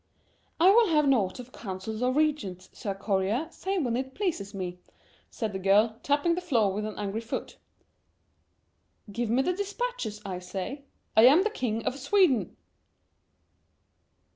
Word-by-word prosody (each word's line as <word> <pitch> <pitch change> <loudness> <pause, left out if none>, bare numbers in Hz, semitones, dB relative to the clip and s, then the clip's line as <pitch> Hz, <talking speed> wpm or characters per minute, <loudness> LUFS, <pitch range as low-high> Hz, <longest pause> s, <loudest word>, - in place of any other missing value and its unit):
"I 360 +4 +7
will 455 +2 +5
have 300 -3 +3
naught 210 -9 +2
of 250 0 -9
councils 215 +1 -6
or 250 0 +2
regents, 255 - -1
Sir 200 -5 -4
Courier, 200 +8 0
save 380 -3 -2
when 235 -1 0
it 265 +1 -4
pleases 335 - -2
me," 180 -3 -5 0.5
said 220 -3 -4
the 190 - -3
girl, 210 +4 +3
tapping 290 +4 +2
the 355 - -2
floor 230 - +2
with 210 +2 -2
an 215 - -7
angry 210 +2 -3
foot. 230 - -6 1.5
"Give 235 +2 -2
me 250 +4 +3
the 360 - +1
dispatches, 405 - -3
I 185 -2 -4
say, 190 +10 -6 0.3
I 220 +2 +8
am 305 +8 +6
the 435 - 0
King 230 - -2
of 270 - -2
Sweden!" 285 - +2
235 Hz, 155 wpm, -28 LUFS, 200-305 Hz, 1.5 s, I